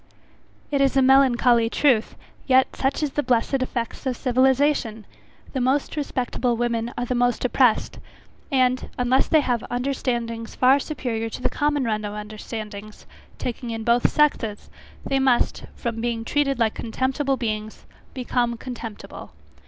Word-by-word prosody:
It 280 -1 +1
is 275 0 +2
a - - +6
melancholy 250 -3 +4
truth; 240 -4 +2 0.3
yet 260 -1 +3
such 275 +3 -1
is 295 - -1
the 295 - 0
blessed 255 +1 +1
effects 240 -2 -3
of 250 -2 -1
civilization! 255 -3 +1 0.5
the 265 - -1
most 265 +5 0
respectable 250 -4 -1
women 235 0 -1
are 245 - -1
the 250 - -2
most 245 0 +1
oppressed; 250 -2 +2 0.5
and, 255 -1 +1
unless 250 +1 +2
they 315 - +4
have 245 -5 -1
understandings 240 -3 -2
far 260 +2 +5
superiour 240 -7 -3
to 225 - -7
the - - +2
common 290 -1 0
run 215 -3 -1
of 205 0 -5
understandings, 210 0 -8 0.3
taking 245 0 -5
in 225 -1 -4
both 235 +1 +3
sexes, 230 -8 0 0.3
they 270 - +1
must, 260 -2 +1
from 230 -2 -4
being 230 -1 -2
treated 275 0 +1
like 225 -2 +1
contemptible 265 +4 -1
beings, 215 -2 -4 0.3
become 245 -2 -1
contemptible. 230 -3 -8
245 Hz, 145 wpm, -23 LUFS, 230-265 Hz, 0.5 s, a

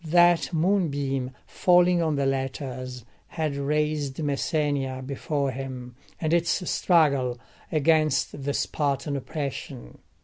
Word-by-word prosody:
That 175 +1 +4
moonbeam 145 -7 0 0.2
falling 180 -1 +4
on 160 -2 +1
the 140 -1 0
letters 130 -2 -3 0.2
had 155 -3 -2
raised 150 -1 -1
Messenia 145 -3 -1
before 140 0 -2
him, 130 -2 -7 0.2
and 160 0 0
its 170 +2 +1
struggle 140 -8 +3 0.3
against 155 -2 +2
the 140 +1 -1
Spartan 140 0 -1
oppression. 135 - -6
145 Hz, 105 wpm, -26 LUFS, 135-160 Hz, 0.3 s, That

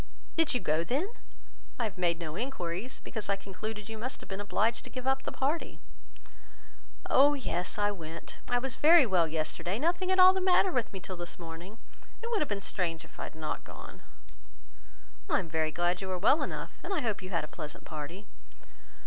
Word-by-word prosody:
"Did 325 -5 +3
you - - +3
go 155 -4 +1
then? 275 - 0 0.7
I 240 - -1
have 215 -4 -2
made 175 -2 +2
no 160 -2 -5
enquiries, 220 -2 -3
because 220 -4 -5
I 200 - +4
concluded 205 +2 -6
you 220 -1 -6
must 255 +4 -4
have - - -11
been 195 +1 -4
obliged 220 +3 +1
to - - -7
give 255 -1 -6
up 265 0 +2
the - - -4
party." 290 +5 -1 1.3
"Oh 285 +2 +6
yes! 180 -10 -1
I 205 0 +2
went. 165 -4 -8
I 245 - +3
was 255 0 -2
very 320 -1 +8
well 180 -6 +3
yesterday; 160 +4 -1
nothing 350 +6 +1
at 375 - +3
all 370 0 +10
the 380 - 0
matter 370 0 +5
with 250 -6 0
me 190 - -6
till 185 0 -6
this 175 0 -6
morning. 170 +5 -8 0.5
It 470 - -3
would 445 - +2
have 300 - 0
been 200 -1 -1
strange 165 -4 -2
if - - -16
I - - -2
had - - -9
not 155 -1 -3
gone." - - -11 1.3
"I - - +4
am 185 - -2
very 160 -1 +1
glad 175 +3 +1
you 190 - -4
were 185 -1 -1
well 215 - +4
enough, - - -4
and - - -5
I 370 -6 +1
hope 220 -5 -1
you 185 - -7
had 170 -4 0
a - - -5
pleasant 150 -2 -6
party." 165 +6 -6
200 Hz, 210 wpm, -31 LUFS, 170-265 Hz, 1.3 s, all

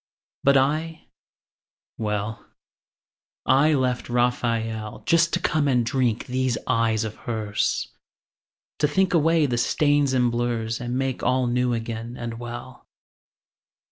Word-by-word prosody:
But 140 0 +5
I, 155 +4 -1 0.9
well, 105 0 -3 1.0
I 150 +4 +4
left 125 -2 -1
Raphael 115 -3 -1
Just 170 0 +3
to - - +2
come 140 -5 +1
drink 120 -1 0
these 130 -2 0
eyes 115 -3 +1
of 110 0 -5
hers, 110 -3 -1 0.9
To 150 - +3
think 190 +5 +1
away 165 -1 +3
the 120 -3 0
stains 145 0 +2
and 125 -2 +2
blurs 120 -1 -2
And 120 +1 -2
make 135 -1 -2
all 130 0 +2
new 125 0 +1
again 115 +1 -5
and 115 -1 -5
well. 120 +1 -8
125 Hz, 120 wpm, -24 LUFS, 115-140 Hz, 1.0 s, But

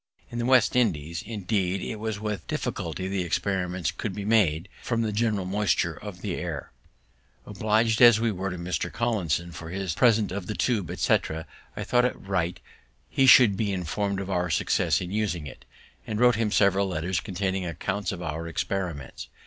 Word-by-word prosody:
In 120 - -4
the 120 - -1
West 130 -2 +4
India 105 -13 +2
islands, 85 -1 -4
indeed, 100 -3 -1
it 110 +5 -4
was 110 -1 -3
with 105 -1 -4
difficulty 85 +3 -3
the 95 0 -1
experiments 90 -1 -1
could 100 -5 -5
be 100 - -5
made, 100 -6 +2
from 115 -1 -1
the 110 - -1
general 105 -3 0
moisture 100 +1 +1
of - - -9
the - - -2
air. - - -5 0.7
Oblig'd 110 +2 +1
as 120 -3 +8
we 115 0 +1
were 95 0 -3
to 90 - -5
Mr. 85 0 -3
Collinson 95 -7 -1
for 80 -1 -8
his 95 -1 -3
present 110 -1 +3
of 95 -1 -4
the 105 - -3
tube, 105 -9 0
etc., 80 -2 0 0.3
I - - -2
thought 125 0 +3
it 125 - -2
right 90 -3 -2 0.5
he 135 - +3
should 125 -6 +8
be 105 0 -1
inform'd 95 +2 -2
of 100 0 -4
our 90 -1 0
success 80 - +1
in 90 0 -5
using 100 -7 -1
it, 70 - -11 0.4
and 110 -1 -2
wrote 125 0 +6
him 110 -1 0
several 100 -1 +3
letters 90 0 -1
containing 95 -1 -2
accounts 90 +4 -3
of 90 -1 -6
our 80 +1 -4
experiments. 85 -4 -4
95 Hz, 185 wpm, -26 LUFS, 90-110 Hz, 0.7 s, as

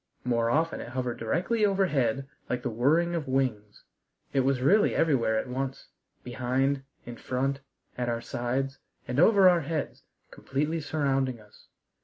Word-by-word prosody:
More 115 -2 +1
often 160 +6 0
it - - -7
hovered 125 -2 -3
directly 180 - 0
overhead 140 - +1 0.2
like 125 -1 -2
the 125 - -2
whirring 155 +10 +2
of 160 -4 -3
wings. 120 -6 -2 0.5
It 135 - +2
was 135 0 +2
really 200 +12 +4
everywhere 130 -9 +2
at 110 - -2
once, 130 +1 -4 0.3
behind, 130 +3 0 0.2
in 120 -1 -8
front, 135 +3 -2 0.4
at 120 -1 -1
our 115 0 -1
sides 125 +3 -3 0.3
and 125 +3 -1
over 195 +2 +6
our 175 -2 +5
heads, 155 -1 -4 0.3
completely 150 +4 -2
surrounding 135 -5 0
us. 105 -1 -20
135 Hz, 150 wpm, -28 LUFS, 120-155 Hz, 0.5 s, over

